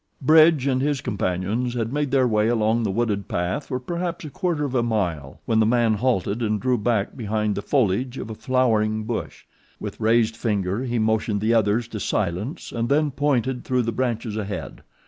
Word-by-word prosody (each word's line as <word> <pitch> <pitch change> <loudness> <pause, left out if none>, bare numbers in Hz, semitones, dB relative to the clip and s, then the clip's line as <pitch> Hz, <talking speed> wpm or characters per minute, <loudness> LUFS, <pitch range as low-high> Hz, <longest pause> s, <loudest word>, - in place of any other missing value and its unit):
Bridge 155 -1 +6
and 130 -2 +1
his 145 0 0
companions 105 +2 -2
had 115 +1 -2
made 145 -1 0
their 130 -1 +3
way 105 -2 +2
along 115 0 +2
the 110 - 0
wooded 105 -1 -1
path 90 +11 -2
for 130 - -2
perhaps 170 +5 -4
a 150 - -7
quarter 165 -3 -1
of 135 - -4
a 125 - +2
mile 90 - -2
when 110 -1 +2
the 110 - +4
man 115 -1 +3
halted 110 -1 0
and 105 -2 0
drew 125 0 +1
back 105 -2 0
behind 105 -3 -1
the 100 - -3
foliage 125 +1 0
of 110 - -6
a - - -4
flowering 110 -3 +1
bush. 110 +1 -5 0.3
With - - -6
raised 115 0 +3
finger 105 0 -1
he 120 -1 -1
motioned 110 -1 +1
the 110 +3 +1
others 110 +1 +2
to 110 - -5
silence 105 - -2
and 115 0 -2
then 150 +1 +2
pointed 130 -2 0
through 125 -1 +1
the 115 - -1
branches 115 -2 -2
ahead. 100 -9 -5
115 Hz, 195 wpm, -23 LUFS, 105-130 Hz, 0.3 s, Bridge